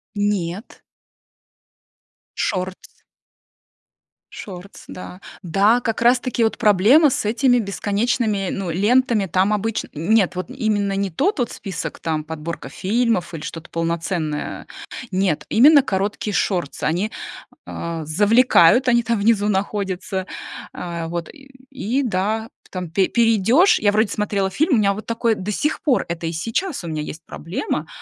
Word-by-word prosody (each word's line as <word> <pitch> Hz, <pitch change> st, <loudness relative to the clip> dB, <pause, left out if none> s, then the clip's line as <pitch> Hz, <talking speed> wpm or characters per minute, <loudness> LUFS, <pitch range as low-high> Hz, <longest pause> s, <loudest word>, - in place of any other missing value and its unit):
Нет. 205 Hz, -1 st, -2 dB, 1.6 s
Шортс. 185 Hz, -1 st, -4 dB, 1.4 s
Шортс, 190 Hz, 0 st, -10 dB
да. 180 Hz, +1 st, -9 dB, 0.2 s
Да, 200 Hz, +6 st, +3 dB
как 225 Hz, 0 st, -2 dB
раз-таки 245 Hz, 0 st, +2 dB
вот 220 Hz, -, +1 dB
проблема 220 Hz, -, +5 dB
с 250 Hz, -, -1 dB
этими 245 Hz, +3 st, +3 dB
бесконечными, 205 Hz, -1 st, -1 dB
ну, 195 Hz, -3 st, -3 dB
лентами 215 Hz, +4 st, +2 dB
там 190 Hz, +3 st, +1 dB
обычно 215 Hz, +1 st, -2 dB
Н 165 Hz, +8 st, 0 dB
нет, 200 Hz, -5 st, +3 dB
вот 185 Hz, -2 st, -4 dB
именно 205 Hz, -5 st, 0 dB
не 195 Hz, 0 st, -1 dB
тот 330 Hz, -, 0 dB
вот 240 Hz, -, 0 dB
список, 190 Hz, -5 st, -6 dB
там 155 Hz, -2 st, -2 dB
подборка 160 Hz, -1 st, -6 dB
фильмов 195 Hz, -, 0 dB
или 160 Hz, -, -6 dB
что-то 165 Hz, +1 st, -8 dB
полноценное, 165 Hz, -2 st, -2 dB
э. -, -, -27 dB, 0.5 s
Нет, 185 Hz, -6 st, 0 dB
именно 285 Hz, +6 st, +7 dB
короткие 205 Hz, -1 st, -2 dB
шортсы. 175 Hz, -7 st, -1 dB
Они, 180 Hz, +8 st, 0 dB, 0.5 s
э, 170 Hz, -1 st, -5 dB
завлекают, 205 Hz, -, +4 dB
они 240 Hz, -1 st, +4 dB
там 230 Hz, -1 st, 0 dB
внизу 210 Hz, -1 st, +2 dB
находятся, 190 Hz, -2 st, -2 dB, 0.5 s
э, 170 Hz, -2 st, -5 dB
вот, 170 Hz, 0 st, -4 dB
э, 275 Hz, -3 st, -15 dB, 0.2 s
и 265 Hz, +1 st, -1 dB
да, 220 Hz, +1 st, -1 dB, 0.2 s
там 180 Hz, -3 st, -5 dB
пе 190 Hz, +2 st, +2 dB
перейдёшь, 235 Hz, -, +4 dB
я 205 Hz, -, +3 dB
вроде 215 Hz, 0 st, +2 dB
смотрела 200 Hz, -2 st, -1 dB
фильм. 300 Hz, -, +2 dB
У -, -, +3 dB
меня 200 Hz, -2 st, +3 dB
вот 215 Hz, +2 st, -8 dB
такое, 230 Hz, 0 st, +1 dB
до 210 Hz, -1 st, -4 dB
сих 300 Hz, +9 st, -1 dB
пор 270 Hz, -5 st, +1 dB
это 170 Hz, -1 st, -4 dB
и -, -, -2 dB
сейчас 230 Hz, -, -2 dB
у -, -, -6 dB
меня 155 Hz, -2 st, -3 dB
есть 155 Hz, +2 st, -8 dB
проблема. 160 Hz, -1 st, -4 dB
200 Hz, 145 wpm, -21 LUFS, 175-230 Hz, 1.6 s, именно